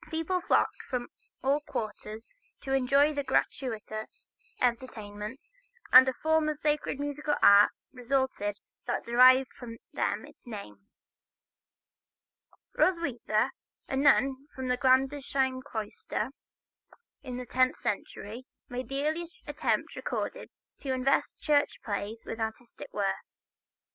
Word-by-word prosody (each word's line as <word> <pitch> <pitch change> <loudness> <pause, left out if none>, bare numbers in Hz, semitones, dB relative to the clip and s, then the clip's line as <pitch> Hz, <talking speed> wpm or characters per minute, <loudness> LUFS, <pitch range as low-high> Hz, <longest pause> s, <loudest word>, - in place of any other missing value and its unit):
People 325 +3 -1
flocked 390 - +2
from 245 -2 -4 0.3
all 275 +2 +3
quarters 215 -4 -6 0.3
to 270 - -3
enjoy 275 +3 +4
the 285 -1 -2
gratuitous 225 - -3 0.3
entertainments, 230 - -3 0.4
and 260 +1 +10
a - - -2
form 315 -1 +3
of 305 - -2
sacred 300 -2 0
musical 290 +1 -1
art 200 +1 +8 0.2
resulted 250 -5 -1 0.3
that - - -1
derived 255 +2 +6
from 230 -2 -9 0.2
them - - -1
its - - -17
name. 105 - -9 1.9
Roswitha, 270 - +1 0.4
a - - -2
nun 275 0 +3
of 260 -1 -3
the 250 - +2
Gandersheim 265 0 +2
cloister, 225 0 -4 0.9
in 250 -1 -6
the 250 - -5
tenth 255 +1 +2
century, 215 +4 -4 0.2
made 250 +2 -5
the 275 +1 -1
earliest 335 +4 -2
attempt - - -1
recorded - - -4 0.3
to 270 -2 -2
invest 260 +1 +1
church 290 -1 +2
plays 210 +1 -4
with 225 - -5
artistic 230 - -5
worth. - - 0
260 Hz, 120 wpm, -29 LUFS, 230-285 Hz, 1.9 s, and